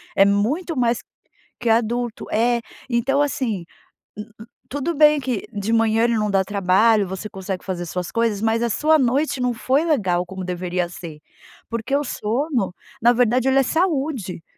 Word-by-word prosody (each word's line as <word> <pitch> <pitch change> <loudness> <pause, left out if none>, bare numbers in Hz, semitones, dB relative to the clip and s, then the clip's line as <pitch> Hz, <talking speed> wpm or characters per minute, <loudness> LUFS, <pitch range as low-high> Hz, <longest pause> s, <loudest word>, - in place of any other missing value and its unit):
é 195 - +6
muito 245 - 0
mais 240 -1 +2 0.6
que 240 - -1
adulto. 235 +1 0
É, 235 +2 +2 0.3
então, 260 +4 +1
assim, 245 -10 -1 0.5
n 210 - -5 0.2
n 220 - -11 0.2
tudo 285 +5 -2
bem 300 0 +5
que 255 -6 -3
de 205 +2 -2
manhã 225 0 +3
ele 235 0 +2
não 210 -1 0
dá 195 -1 +3
trabalho, 200 +2 +3
você 190 +3 -5
consegue 190 -1 -6
fazer 180 -2 -3
suas 180 +1 -4
coisas, 230 -3 0
mas 225 +1 +1
a 235 - +1
sua 305 +9 +3
noite 265 +2 +1
não 250 0 +1
foi 260 +5 +1
legal 190 - +1
como 190 0 -7
deveria 180 0 -2
ser, 165 -4 -9 0.5
porque 230 +4 -2
o 290 - +1
sono, 245 - -1 0.3
na 235 +2 +6
verdade, 245 +1 +2
ele 265 - +3
é - - +4
saúde, 270 - -1
230 Hz, 175 wpm, -21 LUFS, 195-265 Hz, 0.6 s, é